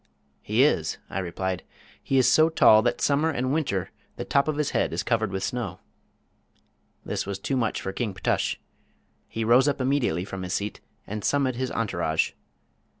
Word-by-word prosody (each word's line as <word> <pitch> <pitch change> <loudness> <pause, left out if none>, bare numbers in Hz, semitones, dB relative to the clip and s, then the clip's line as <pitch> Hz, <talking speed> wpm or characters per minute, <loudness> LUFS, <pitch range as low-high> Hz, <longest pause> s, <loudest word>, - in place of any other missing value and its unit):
"He 110 +5 +2
is," 90 - +1
I 95 - -2
replied. 95 0 -3 0.4
"He 135 - 0
is 130 -2 +5
so 155 +5 +5
tall 110 -9 +6
that 120 - -1
summer 150 +3 +2
and 130 -3 -1
winter 100 - -1 0.2
the - - -5
top 140 +1 +2
of 155 -1 -1
his 150 -2 0
head - - 0
is - - -1
covered 110 -4 0
with 95 0 -3
snow." 125 -1 -3 1.3
This - - -3
was 100 -1 -3
too 135 +7 -2
much 115 -4 0
for 95 - -5
King 105 -3 -3
Ptush. - - 0 0.7
He 115 - -3
rose 125 +4 +5
up 145 -1 0
immediately 130 - 0
from 95 -1 -6
his 90 -1 -4
seat 105 +1 -4 0.2
and 105 0 -5
summoned 135 -4 +1
his 130 0 -1
entourage. 85 -8 0
115 Hz, 180 wpm, -26 LUFS, 95-135 Hz, 1.3 s, tall